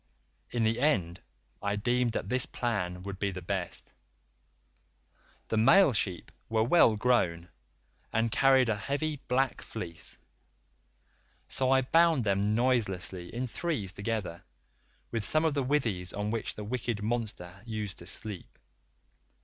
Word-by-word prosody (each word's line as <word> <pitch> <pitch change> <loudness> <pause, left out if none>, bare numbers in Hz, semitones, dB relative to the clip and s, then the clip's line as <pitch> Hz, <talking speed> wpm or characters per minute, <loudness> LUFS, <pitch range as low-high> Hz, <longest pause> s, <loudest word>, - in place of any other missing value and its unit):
In 120 -2 -1
the 110 +2 +1
end 95 - +1 0.4
I 100 0 0
deemed 120 +2 +1
that - - -3
this 125 +3 +3
plan 90 -7 -2
would 100 0 -6
be 100 - 0
the 95 -1 -5
best; 90 -1 -4 1.6
the 110 - 0
male 155 - +6
sheep 95 -4 -2 0.2
were 110 -1 +2
well 120 -3 +5
grown, 90 -8 +1 0.6
and 115 0 +1
carried 135 -1 +4
a 110 - +1
heavy 145 +6 -2
black 130 +1 +1
fleece, 85 -7 -6 1.3
so 130 -1 +1
I 135 0 +5
bound 165 0 +4
them 100 +1 +1
noiselessly 95 -8 0
in 125 +2 -3
threes 125 - -3
together, 100 -5 -3 0.7
with 115 -2 -1
some 155 +8 +3
of 160 - +2
the 140 - 0
withies 115 -10 0
on 105 +1 -2
which 115 -1 -2
the 105 - -6
wicked 115 -1 -3
monster 105 -5 -3
used 105 -5 -5
to 85 - -10
sleep. 105 -1 -4
110 Hz, 140 wpm, -30 LUFS, 100-125 Hz, 1.6 s, male